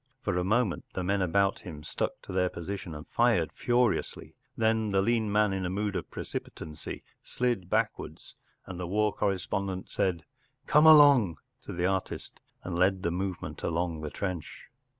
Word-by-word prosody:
For - - 0
a 90 - +1
moment 105 -1 +1
the 95 - -2
men 100 +2 +1
about 95 +2 +2
him 75 -6 -9
stuck - - -3
to - - -9
their 90 -1 +2
position 85 -1 -6
and 75 +2 -9
fired 115 -9 +2
furiously. 120 -1 0 0.2
Then 110 -1 +2
the 100 -1 +2
lean 110 +1 +1
man 105 -1 +3
in 95 -1 -2
a 90 - -1
mood 100 +1 -2
of - - -4
precipitancy 75 -1 -7 0.2
slid 120 -8 -1
backwards, - - -2 0.3
and 95 -1 -7
the 90 - -3
war 105 +3 +1
correspondent 95 -1 -2
said 90 -5 0 0.4
Come 150 +2 +5
along 140 - +7
” - - -49
to - - -6
the 90 0 -1
artist, 95 0 -3 0.2
and 85 -1 -3
led 95 +1 +2
the 85 - 0
movement 95 +1 -4
along 85 -1 -1
the 75 - -4
trench. 90 0 -5
95 Hz, 170 wpm, -29 LUFS, 90-105 Hz, 0.4 s, along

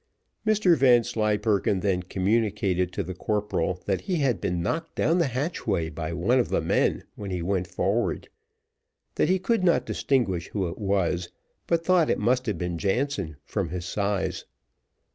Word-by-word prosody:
Mr 215 -5 +4
Vanslyperken 110 - +2
then 95 -2 +1
communicated 95 -1 0
to - - -2
the 95 - -5
corporal 100 -2 -1
that 95 -2 0
he 185 - -2
had 130 - +1
been 90 -3 -1
knocked 165 - -2
down 165 +3 +2
the 170 - +3
hatchway 125 - -2
by 80 0 -4
one 95 +10 +2
of 120 - 0
the - - +1
men - - +1
when 100 -2 -7
he 90 -2 -3
went 90 0 -1
forward; - - -1 0.9
that - - +1
he 190 - +4
could 190 +2 0
not 165 -9 +3
distinguish 95 -14 0
who 95 -4 -2
it 85 - -7
was, 95 -4 0 0.4
but 165 -1 +1
thought 180 -4 +4
that - - +3
it - - -3
must 125 +3 +1
have 105 -5 -1
been 85 -1 -3
Jansen 100 - -1
from 95 -5 -2
his 90 +1 -4
size. 95 -2 -2
100 Hz, 170 wpm, -26 LUFS, 90-130 Hz, 0.9 s, Mr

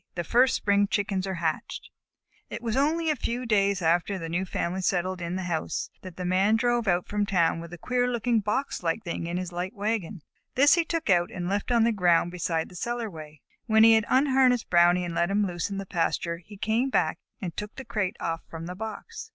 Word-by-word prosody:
THE 175 - -2
FIRST 250 +8 +3
SPRING 200 0 +2
CHICKENS 200 -2 -1
ARE 190 - -2
HATCHED 165 -2 -3 0.6
It - - -6
was 225 -2 -1
only 310 +4 +2
a - - 0
few 245 -1 -3
days 200 -4 +2
after 175 +4 +1
the 165 -2 -6
new 175 +3 -1
family 180 +1 -2
settled 185 0 -1
in 170 +1 -3
the 190 - -3
house 170 -3 -3
that 185 -2 -10
the 180 - -4
Man 190 +4 +3
drove 240 -1 +1
out 175 -1 +1
from 210 0 -1
town 170 -4 +2
with 170 0 -9
a 175 - -8
queer 250 +7 0
looking 240 -1 +1
box 210 +7 -2
like 170 +5 -1
thing 170 -2 -4
in 175 +1 -2
his 180 -1 -4
light 180 +2 -4
wagon. 205 -4 -3 0.3
This 285 +4 +6
he 340 - +3
took 325 - -1
out 175 -1 +3
and 175 -1 -5
left 200 +5 -2
on 235 -2 +4
the 230 - +3
ground 175 -4 +2
beside 170 -2 -2
the 180 - -14
cellarway. 175 - -5 0.3
When 220 -1 +5
he 225 0 +8
had 220 -1 +3
unharnessed 260 -3 +3
Brownie 175 +1 +5
and 170 - -5
let 170 +1 +1
him 205 +1 +2
loose 175 -1 -3
in 200 - -4
the 195 - -4
pasture, 170 -1 -1
he 200 +4 -14
came 225 +6 0
back - - +1 0.2
and 180 -7 -5
took 210 0 -6
the 265 - -8
crate 200 -5 -2
off 165 -1 -2
from 165 0 -7
the 180 - -5
box. 220 - -7
195 Hz, 225 wpm, -27 LUFS, 175-225 Hz, 0.6 s, he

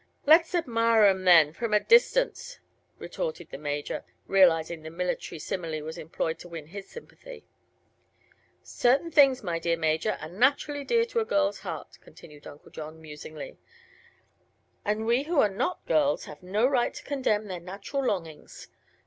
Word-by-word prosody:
"Let's 325 +4 +5
admire 230 -8 +2
'em, 190 -2 +2
then 165 -4 +6
from 220 +4 -1
a - - +5
distance," - - +2 0.4
retorted - - -5
the - - -7
Major, 145 0 -4 0.2
realizing 170 -4 +3
the 160 - -8
military 175 0 -4
simile 160 -1 -4
was 160 +1 -6
employed 160 +1 -3
to - - -11
win 165 -3 -8
his 195 +5 -10
sympathy. 475 0 -12 1.2
"Certain 270 +7 +1
things, 275 -5 +5
my 170 -3 -2
dear 170 0 0
Major, 160 +5 0
are 155 - -7
naturally 280 - +1
dear 460 +9 +2
to 470 0 -2
a - - +1
girl's 300 -6 0
heart," - - -8
continued 150 -2 -15
Uncle 145 - -14
John, 155 +1 -9
musingly; 155 -1 -10 1.2
"and 210 +1 -1
we 235 +3 +2
who 325 -1 +1
are 210 - +4
not 350 - -2
girls 295 -2 +1
have 150 - -11
no 200 +6 0
right 255 -2 +1
to - - -9
condemn 255 -7 -1
their 185 -3 -6
natural 195 +10 -5
longings. 165 - -5
200 Hz, 155 wpm, -27 LUFS, -, 1.2 s, then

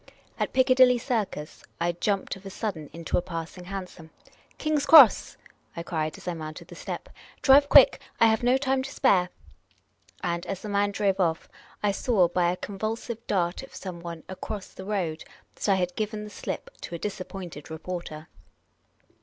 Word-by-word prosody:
At - - -1
Piccadilly 255 -1 +5
Circus, 215 - -3 0.2
I 170 +1 +1
jumped 195 +4 -1
of 195 - -14
a 195 - -7
sudden 190 -7 -4
into 165 +1 -1
a - - -3
passing 175 0 -7
hansom. 185 -4 -7 0.3
" - - -31
King's 305 -2 0
Cross! 285 -9 +8 0.2
" - - -29
I 170 - -3
cried, 155 -2 -3
as - - -14
I 175 - 0
mounted 155 -1 -8
the - - -10
step. - - -6 0.2
" - - -25
Drive 285 +1 +6
quick! - - +7 0.2
I - - +7
have 220 -1 +3
no 245 +2 +4
time 265 -1 0
to 270 +1 -6
spare." 185 -11 +3 0.9
And, 170 -1 -1
as 195 - -5
the 210 - -5
man 200 0 +2
drove 200 -1 0
off, 165 -3 0 0.4
I 205 - +3
saw, 195 -3 +2
by 175 0 +1
a 180 - -4
convulsive 220 +4 -5
dart 175 -3 0
of 270 - -12
someone 170 -3 -7
across 190 +1 -6
the 190 - -10
road, 180 -6 -2 0.3
that - - -3
I 195 - +5
had 180 -1 -1
given 215 0 -3
the 210 - -9
slip - - -6
to 175 - -6
a - - -3
disappointed 185 -5 -6
reporter. 160 -1 -6
195 Hz, 185 wpm, -26 LUFS, 170-220 Hz, 0.9 s, Cross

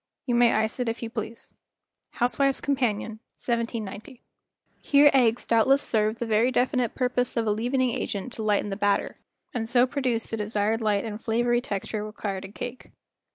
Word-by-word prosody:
You 245 - -1
may 240 -1 +5
ice 220 +3 0
it 245 -2 0
if 230 +1 -4
you 225 - -5
please" 225 0 -6 0.3
(< - - -60
Housewife's 270 +2 +2
Companion," 225 -6 -1 0.2
1790. 230 0 -4 0.6
Here 290 0 +5
eggs 245 -3 +3
doubtless 265 +5 +3
served 215 0 +1
the 235 - -3
very 225 +2 +3
definite 250 -2 +1
purpose 250 -1 0
of 230 - +1
a 210 - +2
leaven¬ 245 +5 -1
ing 250 - +1
agent 205 +5 -4
to - - -6
lighten 210 -1 +1
the - - -2
batter 205 -1 0 0.3
and 225 -3 -3
so 245 +1 +5
produce 255 -4 -1
the 225 - -2
desired 215 +1 0
light 210 -2 +1
and 215 -1 -5
flavory 240 +1 +1
texture 210 -1 -4
required 205 -2 -5
in 195 - -11
cake. 245 +3 -7
230 Hz, 180 wpm, -26 LUFS, 215-250 Hz, 0.6 s, may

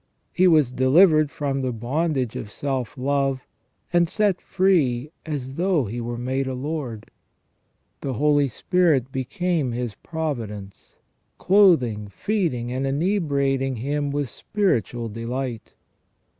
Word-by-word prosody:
He 185 +1 +4
was 155 -7 +4
delivered 155 +4 +5
from 140 -2 -2
the 130 -1 -1
bondage 130 +2 -1
of 105 - -5
self 130 +1 -3
love, 135 0 0 0.5
and 175 -1 +3
set 200 -1 +1
free 150 -9 +1 0.2
as 135 -4 -4
though 170 -3 +1
he 115 +4 -4
were 120 0 -4
made 130 +2 -2
a 130 - -3
lord. 130 -5 -5 0.9
The 135 - -3
Holy 145 +2 +3
Spirit 140 -1 +1
became 145 - -1
his 120 -2 -3
providence, 115 - -6 0.4
clothing, 160 - +4
feeding, 130 - -2
and 130 +2 -1
inebriating 140 -5 0
him 145 +5 -2
with 145 -1 -1
spiritual 120 - -1
delight. 115 +1 -5
135 Hz, 120 wpm, -23 LUFS, 125-160 Hz, 0.9 s, delivered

